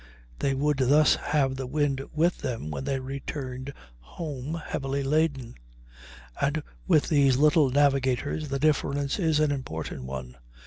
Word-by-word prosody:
They 135 -1 +1
would 145 +1 +1
thus 145 +4 +5
have 140 -3 0
the 130 -1 -5
wind 140 -1 0
with 165 +3 +1
them 115 - -4
when 130 - -4
they 135 -2 -1
returned 130 0 -5 0.3
home 140 - -6
heavily 135 0 -2
laden, 140 -4 0 0.9
and 150 +2 0 0.2
with 160 -5 +4
these 140 -4 +4
little 150 0 +4
navigators 140 +1 +1
the 140 - -1
difference 140 +1 0
is 160 -4 +2
an 155 -1 +3
important 80 - -5
one. 65 -1 -7
140 Hz, 140 wpm, -27 LUFS, 130-150 Hz, 0.9 s, thus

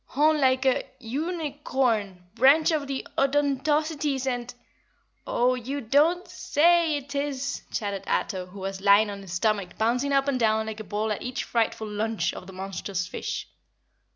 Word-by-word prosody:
"Horn 300 +2 +2
like 260 0 +3
a 260 - +3
uni 295 +4 -4
corn 215 -8 0
branch 290 +6 +5
of 300 -3 -1
the 270 -1 -3
Odontocetes 285 0 +1
and 245 -2 -2 0.4
" - - -41 0.3
"Oh 250 +1 +2
you 255 +3 -4
don't 295 +9 +2
say 330 0 +3
it 285 0 -8
is!" 275 -1 -2
chattered 200 -2 -3
Ato, 185 -2 -1
who 195 +2 -11
was 190 0 -4
lying 205 +1 +5
on 200 0 -7
his 190 -3 -9
stomach 200 -1 0
bouncing 245 +5 +1
up 275 0 +2
and 270 -2 +1
down 220 -1 +2
like 220 0 -6
a - - -5
ball 215 +1 -2
at 210 - -2
each 250 0 -3
frightful 225 -1 -1
lunge 215 +1 -1
of 185 - -9
the 190 - -10
monstrous 190 0 -4
fish. 185 - -5
255 Hz, 170 wpm, -26 LUFS, 210-285 Hz, 0.4 s, branch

